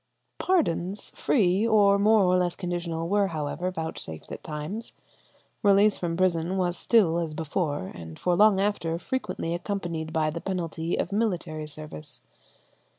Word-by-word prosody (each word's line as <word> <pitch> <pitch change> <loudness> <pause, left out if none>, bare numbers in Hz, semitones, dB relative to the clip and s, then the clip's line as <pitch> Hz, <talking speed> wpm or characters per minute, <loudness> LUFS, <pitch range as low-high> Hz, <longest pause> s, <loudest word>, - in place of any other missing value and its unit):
Pardons 200 - 0
free 200 -2 +2
or 200 -3 +5
more 215 0 +5
or 180 0 +3
less 180 -1 +1
conditional 175 -3 -3
were, 200 +1 +2
however, 160 +2 -3
vouchsafed 160 - -5
at - - -7
times. 155 +9 -5 0.7
Release 205 0 +5
from 165 -2 -3
prison 180 0 +1
was 180 -2 0
still, 180 -8 +3
as 160 -3 -3
before, 150 - -2
and 80 -2 -9
for 180 -1 +1
long 210 0 +5
after, 195 -5 0
frequently 185 -6 -3
accompanied 170 -4 -3
by 155 -1 +1
the 170 +2 -5
penalty 170 -3 -2
of 180 - -2
military 175 -8 -1
service. 150 -3 -9
175 Hz, 145 wpm, -27 LUFS, 160-200 Hz, 0.7 s, or